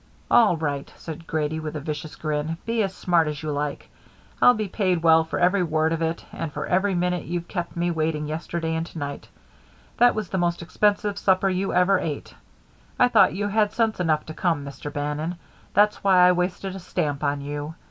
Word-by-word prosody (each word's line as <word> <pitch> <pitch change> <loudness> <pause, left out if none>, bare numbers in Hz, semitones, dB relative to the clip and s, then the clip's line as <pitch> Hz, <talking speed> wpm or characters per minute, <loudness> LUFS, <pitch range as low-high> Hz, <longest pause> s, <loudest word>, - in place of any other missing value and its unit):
"All 215 -8 +5
right," 145 -3 -3
said 165 0 -9
Grady, 155 0 -1
with 155 0 -5
a - - -2
vicious 150 +1 -5
grin. 155 +1 -2
"Be 230 0 0
as 195 -2 0
smart 175 -3 +1
as 150 0 -4
you 155 - -2
like. 145 0 -3 0.5
I'll 245 - +7
be 215 -1 -2
paid 185 -4 0
well 160 -1 +6
for 160 - -4
every 185 +2 +3
word 160 -1 +1
of 165 - -2
it 165 +1 -2
and 165 -2 -4
for - - -4
every 190 +1 +1
minute 180 0 0
you've 170 +1 -4
kept 175 -3 -4
me 175 0 0
waiting 155 -2 -1
yesterday 160 +1 -3
and 160 0 -1
to - - -11
night 145 -1 -5 0.7
That 245 0 +5
was 215 -4 -3
the 190 - -1
most 175 0 0
expensive 205 +3 +1
supper 190 0 +3
you 190 +1 -1
ever 185 +1 +4
ate. 150 -3 -5 0.6
I 250 - +5
thought - - +5
you 205 +1 -1
had 210 0 +1
sense 225 -3 0
enough 160 -4 +1
to 155 - -7
come, 160 -4 -1
Mr. 140 +1 -7
Bannon. 150 +4 -3 0.4
That's 210 +1 +3
why 185 -2 +6
I - - +6
wasted 180 +2 -2
a - - -6
stamp 150 -5 -2
on 140 0 0
you. 145 +2 -5
170 Hz, 210 wpm, -24 LUFS, 155-190 Hz, 0.7 s, I'll